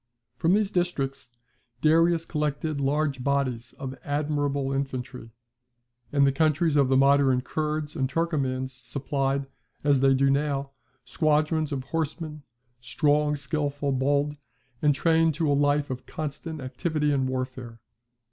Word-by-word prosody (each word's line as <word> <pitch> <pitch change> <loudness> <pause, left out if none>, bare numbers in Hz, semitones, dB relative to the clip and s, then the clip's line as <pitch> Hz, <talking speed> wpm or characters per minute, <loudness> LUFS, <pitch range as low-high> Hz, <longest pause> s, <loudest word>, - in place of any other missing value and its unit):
From 165 +3 +2
these 205 -1 +2
districts 140 -8 -2 0.5
Darius 165 +1 +4
collected 150 -1 -2
large 140 -1 0
bodies 130 -4 -1
of 135 -1 -6
admirable 145 -2 -1
infantry; 130 -3 -4 0.8
and 140 -1 +4
the 135 - +4
countries 155 +2 +2
of 140 -2 +4
the 135 - +4
modern 135 -1 +4
Kurds 150 +2 -3
and 135 -4 0
Turkomans 135 -5 -1
supplied, 135 +2 -2 0.4
as 140 -2 +4
they 135 0 +4
do 135 +1 +3
now, 140 -1 -1 0.3
squadrons 155 +2 +1
of 135 -2 -2
horsemen, 155 +1 -3 0.4
strong, 150 +3 +1
skilful, 145 0 -2
bold, 140 +2 +1 0.4
and 145 -2 +3
trained 165 +1 +3
to 155 -2 +1
a - - +4
life 145 0 +2
of 130 0 -6
constant 155 +1 -5
activity 150 +3 -1
and 135 -2 +1
warfare. 130 -2 -5
145 Hz, 130 wpm, -26 LUFS, 135-155 Hz, 0.8 s, Darius